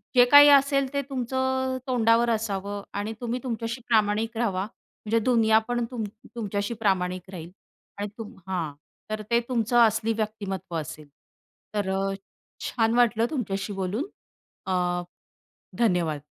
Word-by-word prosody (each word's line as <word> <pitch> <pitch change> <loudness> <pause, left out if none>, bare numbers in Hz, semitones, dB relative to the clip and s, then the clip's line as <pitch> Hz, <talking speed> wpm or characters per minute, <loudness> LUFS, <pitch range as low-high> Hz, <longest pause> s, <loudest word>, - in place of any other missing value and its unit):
जे 245 0 +8
काही 290 0 +10
असेल 275 -1 +4
ते 280 - +1
तुमचं 260 0 -1
अ, - - -2
तोंडावर 235 -1 +3
असावं 205 -2 -2
आणि 205 +2 -3
तुम्ही 240 +1 -2
तुमच्याशी 235 0 -3
प्रामाणिक 220 +1 +2
राहावा. 195 -5 0 0.4
म्हणजे 225 +2 +2
दुनिया 225 -3 +4
पण 240 -1 0
तुम 230 -3 -3 0.3
तुमच्याशी 205 0 -2
प्रामाणिक 185 -3 0
राहील 170 -1 -8 0.5
आणि 205 +1 -3
तुम 225 +1 -8
हां, 170 -6 -2 0.4
तर 215 0 -3
ते 235 - +5
तुमचं 240 0 +1
असली 225 +1 0
व्यक्तिमत्त्व 210 -5 -4
असेल. 150 0 -8 0.7
तर 200 -2 0
अ, 195 0 0 0.5
छान 225 -1 +1
वाटलं 235 -2 +3
तुमच्याशी 200 -6 -2
बोलून. 195 - -2 0.6
अ, 180 -1 0 0.8
धन्यवाद. 175 -9 +1
220 Hz, 135 wpm, -26 LUFS, 195-240 Hz, 0.8 s, काही